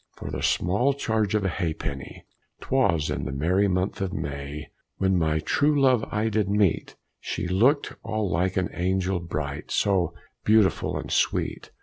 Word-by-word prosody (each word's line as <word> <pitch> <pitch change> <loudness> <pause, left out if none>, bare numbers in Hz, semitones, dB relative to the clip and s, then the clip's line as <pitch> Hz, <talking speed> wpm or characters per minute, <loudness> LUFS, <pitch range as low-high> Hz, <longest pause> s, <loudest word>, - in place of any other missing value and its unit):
For - - -6
the - - -4
small 120 +10 +2
charge 110 -6 0
of 105 -2 +1
a - - +3
ha'penny! 80 -6 -4 0.3
'Twas 85 - +1
in - - -2
the - - -3
merry 90 +9 +2
month 95 +2 -1
of 95 -2 -1
May, 70 -4 -5 0.3
When 95 -1 +2
my 80 -3 +2
true 145 - +2
love 130 -5 +4
I 105 +1 0
did 105 -2 0
meet; 100 -4 +1 0.2
She - - -3
look'd 120 - +2
all 110 -2 -2
like 90 +2 0
an 95 - 0
angel 95 +1 0
bright, 75 -4 -5
So 90 -4 +1 0.3
beautiful 105 -2 +3
and - - -6
sweet. - - 0
95 Hz, 160 wpm, -26 LUFS, 85-110 Hz, 0.3 s, love